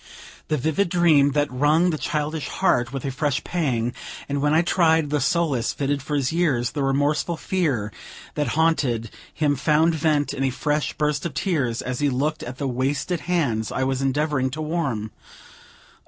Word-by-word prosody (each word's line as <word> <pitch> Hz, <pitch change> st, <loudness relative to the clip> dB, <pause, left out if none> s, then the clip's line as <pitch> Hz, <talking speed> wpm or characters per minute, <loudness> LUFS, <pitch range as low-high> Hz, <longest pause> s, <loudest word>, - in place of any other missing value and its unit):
The 155 Hz, -, 0 dB
vivid 160 Hz, +7 st, 0 dB
dream 160 Hz, -5 st, +4 dB
had 145 Hz, -3 st, 0 dB
wrung 160 Hz, +5 st, +4 dB
the 155 Hz, -, -2 dB
childish 150 Hz, 0 st, -2 dB
heart 120 Hz, 0 st, +1 dB
with 135 Hz, -1 st, -5 dB
a 135 Hz, -, -1 dB
fresh 145 Hz, 0 st, -1 dB
pang, 125 Hz, -9 st, -1 dB, 0.3 s
and 140 Hz, 0 st, -2 dB
when 150 Hz, +1 st, +2 dB
I 160 Hz, +2 st, +4 dB
tried 160 Hz, -4 st, +2 dB
the 150 Hz, -2 st, +1 dB
solace 140 Hz, -5 st, +1 dB
fitted 140 Hz, 0 st, -1 dB
for 145 Hz, +3 st, -3 dB
his 140 Hz, 0 st, 0 dB
years, 140 Hz, -9 st, +1 dB
the 145 Hz, -, -3 dB
remorseful 145 Hz, +5 st, +1 dB
fear 145 Hz, -, -1 dB, 0.4 s
that 150 Hz, -2 st, -1 dB
haunted 130 Hz, -9 st, +1 dB, 0.2 s
him 145 Hz, -1 st, +1 dB
found 155 Hz, +4 st, +3 dB
vent 155 Hz, -2 st, +1 dB
in 135 Hz, -, -2 dB
a 135 Hz, -, +2 dB
fresh 150 Hz, +3 st, -1 dB
burst 150 Hz, -1 st, -1 dB
of 145 Hz, -, -11 dB
tears, 135 Hz, -9 st, -1 dB
as 125 Hz, 0 st, -3 dB
he 145 Hz, -, +2 dB
looked 145 Hz, +4 st, -1 dB
at 125 Hz, +1 st, -7 dB
the 140 Hz, -, -2 dB
wasted 135 Hz, +7 st, -1 dB
hands 140 Hz, -12 st, -1 dB
I 130 Hz, -, -1 dB
was 135 Hz, 0 st, -1 dB
endeavoring 135 Hz, 0 st, 0 dB
to 150 Hz, +4 st, -5 dB
warm: 140 Hz, -10 st, -2 dB
"Oh! -, -, -29 dB
145 Hz, 185 wpm, -23 LUFS, 130-160 Hz, 0.4 s, dream